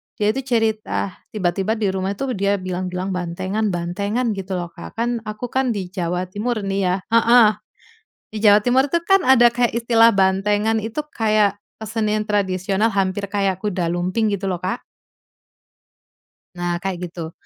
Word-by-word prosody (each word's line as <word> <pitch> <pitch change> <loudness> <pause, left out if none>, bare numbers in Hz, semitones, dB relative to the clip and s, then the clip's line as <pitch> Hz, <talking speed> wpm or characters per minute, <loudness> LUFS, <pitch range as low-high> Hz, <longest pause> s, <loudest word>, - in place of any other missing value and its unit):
dia 210 - 0
itu 270 - -3
cerita 220 -5 -1 0.2
tiba-tiba 195 +1 0
di 215 -3 0
rumah 190 +1 -2
tuh 255 0 -3
dia 200 +1 +2
bilang-bilang, 185 0 -3
"Bantengan 190 +3 -2
bantengan," 200 +8 -1
gitu, 195 0 -5
loh, 175 -2 -3
Kak. 170 0 -10
Kan, 235 0 -2
aku 215 +3 -5
kan 260 -1 0
di 190 -4 -4
Jawa 180 0 -3
Timur 215 +4 -2
nih 195 0 -2
ya 180 0 +2
heeh, 230 0 +6 0.8
di 215 - -5
Jawa 210 -1 +6
Timur 260 +4 +3
tuh 340 +4 0
kan 390 +2 +4
ada 240 -2 +6
kayak 240 -1 0
istilah 230 -1 +4
bantengan, 205 +3 +2
itu 225 +7 -4
kayak 215 -3 +1 0.2
kesenian 215 -1 -1
tradisional 195 0 0
hampir 195 +1 0
kayak 195 -2 -1
kuda 180 -5 -1
lumping 185 +5 0
gitu, 195 -1 -2
loh, 180 -2 -3
Kak. 190 +6 -3 1.7
Nah, 175 0 -1
kayak 180 -2 -3
gitu. 165 -2 -7
205 Hz, 160 wpm, -21 LUFS, 185-225 Hz, 1.7 s, heeh